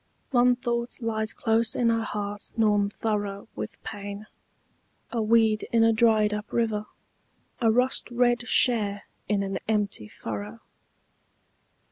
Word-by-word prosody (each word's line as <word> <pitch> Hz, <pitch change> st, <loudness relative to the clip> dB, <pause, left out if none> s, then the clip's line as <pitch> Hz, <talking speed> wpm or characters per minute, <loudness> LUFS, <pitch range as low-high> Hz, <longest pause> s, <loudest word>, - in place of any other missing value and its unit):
One 245 Hz, -1 st, +4 dB
thought 240 Hz, -1 st, -3 dB
lies 220 Hz, -2 st, -1 dB
close 225 Hz, 0 st, +1 dB
in 235 Hz, -2 st, +2 dB
her 230 Hz, 0 st, +2 dB
heart 205 Hz, -1 st, -5 dB
gnawn 210 Hz, -2 st, +3 dB
thorough 205 Hz, -1 st, -3 dB
With -, -, -5 dB
pain, 205 Hz, -1 st, -6 dB, 0.9 s
a 235 Hz, -, -1 dB
weed 220 Hz, -1 st, +3 dB
in 230 Hz, -1 st, +4 dB
a 225 Hz, 0 st, +5 dB
dried 220 Hz, -2 st, +3 dB
up 210 Hz, +1 st, -5 dB
river, 220 Hz, -3 st, 0 dB, 0.7 s
A 230 Hz, -, +3 dB
rust 250 Hz, +3 st, +2 dB
red 240 Hz, 0 st, +1 dB
share 210 Hz, -5 st, +2 dB, 0.3 s
in 205 Hz, -1 st, +1 dB
an 195 Hz, -1 st, -3 dB
empty 205 Hz, -, -1 dB
furrow. 105 Hz, +1 st, -7 dB
220 Hz, 130 wpm, -26 LUFS, 205-230 Hz, 0.9 s, a